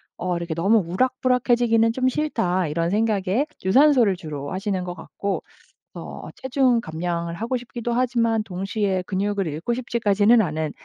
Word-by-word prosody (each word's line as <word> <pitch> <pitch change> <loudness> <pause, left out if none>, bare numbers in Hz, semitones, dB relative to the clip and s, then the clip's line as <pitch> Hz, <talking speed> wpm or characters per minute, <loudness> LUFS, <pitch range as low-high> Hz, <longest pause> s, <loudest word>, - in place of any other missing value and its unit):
어 180 -1 -2
이렇게 170 -1 -4
'너무 195 +8 +3
우락부락해지기는 240 +1 +2
좀 255 +2 0
싫다.' 185 - 0
이런 165 +3 -1
생각에 215 +4 +1 0.2
유산소를 245 -2 +5
주로 150 -5 -6
하시는 190 -1 -2
것 175 -1 -5
같고 195 +3 -4 0.5
어 - - -8
체중 260 -2 +1
감량을 170 0 -3
하고 235 +6 -2
싶기도 240 -1 -5
하지만 235 -3 +1
동시에 195 0 -2
근육을 200 0 -1
잃고 160 +10 -2
싶지까지는 225 -2 +3
않은 155 -4 -2
205 Hz, 350 characters per minute, -23 LUFS, 180-240 Hz, 0.5 s, 유산소를